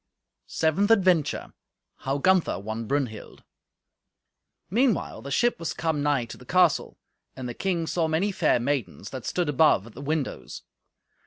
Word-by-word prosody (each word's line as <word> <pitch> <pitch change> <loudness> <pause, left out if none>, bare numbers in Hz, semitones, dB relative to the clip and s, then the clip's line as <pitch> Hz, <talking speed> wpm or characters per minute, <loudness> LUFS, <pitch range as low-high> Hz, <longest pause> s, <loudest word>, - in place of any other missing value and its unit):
Seventh 165 +6 +1
Adventure 185 -8 +2 0.4
How 135 +1 -2
Gunther 185 +4 +2
Won 110 +3 -5
Brunhild 130 -6 -3 1.2
Meanwhile 235 +3 0
the 140 - -8
ship 240 - +1
was 165 - -3
come 160 -3 -1
nigh 145 -4 +1
to - - -10
the - - -14
castle, - - +2 0.4
and 130 -1 -6
the 120 - -5
king 175 +2 -1
saw 165 0 0
many 165 +6 0
fair 155 -9 +2
maidens 125 -5 -3
that 130 -3 -6
stood 180 -3 -1
above 150 -8 +3
at 115 - -13
the 135 - -9
windows. 150 -1 -3
150 Hz, 150 wpm, -26 LUFS, 130-180 Hz, 1.2 s, above